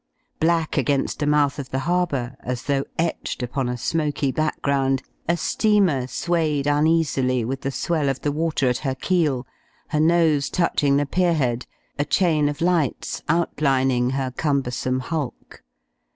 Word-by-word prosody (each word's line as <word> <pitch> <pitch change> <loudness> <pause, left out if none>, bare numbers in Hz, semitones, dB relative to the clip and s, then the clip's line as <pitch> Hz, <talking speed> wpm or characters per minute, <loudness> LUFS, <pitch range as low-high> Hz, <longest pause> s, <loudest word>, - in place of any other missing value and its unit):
Black 165 -1 +1
against 135 +1 0
the 145 - 0
mouth 145 -1 +2
of 135 -2 -6
the 130 - -2
harbour, 150 -8 0
as 125 0 -4
though 140 -1 0
etched 165 -5 -2
upon 125 +1 -2
a 125 - -2
smoky 145 0 -1
background, 135 -3 0 0.3
a 170 - +3
steamer 185 - +2
swayed 155 -2 0
uneasily 145 -5 +2
with 135 +2 -3
the 135 - -2
swell 150 +1 0
of 135 - -3
the 145 - 0
water 155 -2 0
at 125 0 +1
her 135 -2 -2
keel, 150 -5 0 0.4
her 150 - 0
nose 155 -3 +3
touching 145 -5 +2
the 145 - +1
pier 175 +3 +1
head, 125 -5 -1 0.3
a - - +3
chain 155 -3 +2
of 145 +1 -6
lights 170 -6 0
outlining 135 -6 +2
her 135 -1 -2
cumbersome 130 -2 -1
hulk. 145 -1 -5
145 Hz, 150 wpm, -23 LUFS, 130-160 Hz, 0.4 s, a